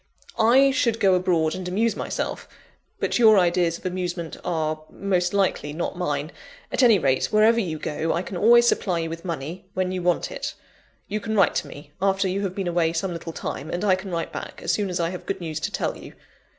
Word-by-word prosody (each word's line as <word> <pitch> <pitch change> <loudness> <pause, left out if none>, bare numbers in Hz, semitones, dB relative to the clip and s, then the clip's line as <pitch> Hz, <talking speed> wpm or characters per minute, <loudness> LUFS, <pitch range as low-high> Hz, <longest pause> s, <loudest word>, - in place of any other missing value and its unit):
I 260 +5 +6
should 235 -3 +1
go 195 -2 +4
abroad 175 -3 +2
and 185 -1 -5
amuse 215 +5 +1
myself; - - -4 0.5
but - - 0
your 220 -3 +7
ideas 175 -2 +2
of - - -20
amusement 180 -2 -3
are, 155 -3 -1
most 180 -3 0
likely, 190 -7 0
not 170 +3 -3
mine. 150 -3 -2 0.4
At - - +1
any 235 -5 +6
rate, 135 -6 +1
wherever 220 +2 +4
you 170 -8 -2
go, 155 +2 -2
I 175 - 0
can 190 - -7
always 235 +6 +6
supply 185 -6 +1
you 165 -1 -2
with 165 0 -7
money, 170 0 -5
when 185 0 0
you 185 -1 -3
want 175 - 0
it; - - -5 0.5
you 210 +1 -2
can 220 +1 -3
write 195 - +4
to - - -2
me, 145 0 -12
after 195 0 +2
you 190 +2 -1
have 190 -2 -3
been 195 -2 -2
away 170 -1 +1
some 175 +2 -2
little 165 0 -6
time, 155 -1 -5
and 175 +3 -3
I 195 - +5
can 190 +1 -3
write 170 -2 -3
back, - - -7
as - - +1
soon 205 -2 0
as 180 - -2
I 170 0 0
have 180 - -8
good - - -2
news 160 -3 -4
to - - -3
tell - - -2
you. - - -11
180 Hz, 225 wpm, -24 LUFS, 165-200 Hz, 0.5 s, your